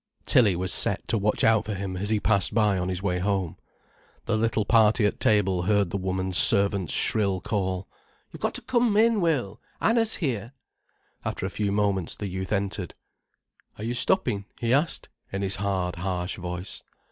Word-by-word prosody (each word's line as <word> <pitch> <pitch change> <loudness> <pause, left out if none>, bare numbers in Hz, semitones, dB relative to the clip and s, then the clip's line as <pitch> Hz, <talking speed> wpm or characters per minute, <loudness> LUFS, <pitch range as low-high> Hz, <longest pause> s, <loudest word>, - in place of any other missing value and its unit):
Tilly 115 - +4
was 90 +1 -1
set - - +2
to 115 - +1
watch 105 +2 0
out 110 -1 +3
for 105 - -4
him 95 -1 -5
as 100 +3 -2
he 110 -1 +1
passed 100 -3 +1
by 105 -4 +2
on 90 +1 -2
his 95 +1 -3
way 90 -2 -1
home. 95 -3 -2 0.7
The 115 - 0
little 110 -1 0
party 110 -1 +3
at 105 - -1
table 95 -4 +2
heard 100 -1 +1
the - - -2
woman's 95 -1 +1
servant's 100 -3 +5
shrill 100 -4 +3
call: 95 0 -3 0.4
"You've - - -12
got - - -2
to - - -7
come 240 -4 +1
in, 225 -1 +3
Will. 135 - -1 0.2
Anna's 225 -1 +1
here." 120 - -3 0.7
After - - -4
a 95 - -4
few 100 -1 -2
moments, 100 -4 -1
the 105 - -6
youth 95 0 -6
entered. 100 -3 -3 0.8
"Are 105 - -8
you 115 +2 -2
stopping?" 115 - 0
he 120 0 0
asked 150 +5 -1 0.2
in 95 +1 -3
his 95 0 -1
hard, 95 -3 -2
harsh 90 0 -3
voice. 90 +1 -7
100 Hz, 180 wpm, -25 LUFS, 95-110 Hz, 0.8 s, servant's